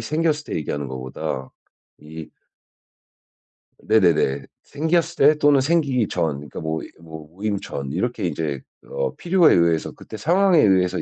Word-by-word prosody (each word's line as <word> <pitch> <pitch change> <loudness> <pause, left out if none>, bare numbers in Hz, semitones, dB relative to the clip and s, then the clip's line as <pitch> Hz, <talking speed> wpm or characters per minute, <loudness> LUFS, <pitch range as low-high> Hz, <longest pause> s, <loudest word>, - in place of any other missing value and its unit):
생겼을 155 +5 -1
때 - - -6
얘기하는 75 -2 -4
것보다 65 0 -5 0.5
이 80 +1 -10 1.5
네네네. 80 -10 +2 0.2
생겼을 165 +3 -1 0.2
때 150 - -10
또는 145 -2 +4
생기기 135 -6 +1
전. 80 -3 -1
그러니까 75 +2 -9
뭐 80 0 -3
이 - - -11
뭐 80 -2 -10
모임 100 +4 -3
전 70 -8 -6
이렇게 95 - -2
인제 75 -5 -3 0.3
어 - - -3
필요에 175 -1 +4
의해서 85 -2 +2
그때 110 - -11
상황에 180 - +3
의해서 95 -5 +3
95 Hz, 300 characters per minute, -22 LUFS, -, 1.5 s, 또는